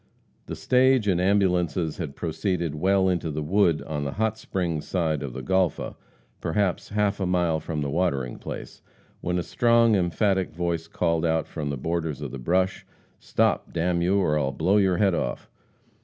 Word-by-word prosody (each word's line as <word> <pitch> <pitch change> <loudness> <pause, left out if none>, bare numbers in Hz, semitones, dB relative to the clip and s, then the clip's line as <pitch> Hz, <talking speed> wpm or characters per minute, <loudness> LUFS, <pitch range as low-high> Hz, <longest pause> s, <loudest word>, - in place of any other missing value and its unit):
The - - -5
stage 130 -3 +3
and 90 -3 +2
ambulances 90 -4 +1
had 75 -6 -5
proceeded 85 -1 -2
well 95 +5 +2
into 90 -3 0
the 75 0 -3
wood 85 -1 +2
on 75 -2 -4
the 70 - -3
Hot 110 +1 0
Springs 90 -8 -3
side 80 -6 0
of 70 -4 -5
the 65 0 -6
Golpha, 95 -2 0 0.4
perhaps 95 +2 -1
half 105 -1 0
a 95 - 0
mile 90 -3 +1
from 80 -1 -4
"the 70 - -2
watering 70 -7 -1
place," - - -8 0.4
when 90 0 -1
a 90 - -1
strong, 115 0 +3
emphatic 95 0 0
voice 85 -1 -2
called 85 -1 0
out 80 -1 +1
from 75 -3 -4
the 70 - -3
borders 80 0 -2
of - - -5
the 70 - -6
brush: 90 +8 0 0.4
"Stop! - - 0
d 85 - -3
n 85 0 +1
you, 95 +3 +2
or 75 -6 +2
I'll 70 -2 0
blow 90 +8 +2
your 95 -3 +3
head 100 -1 +3
off!" 60 -7 -3
85 Hz, 185 wpm, -25 LUFS, 80-95 Hz, 0.4 s, stage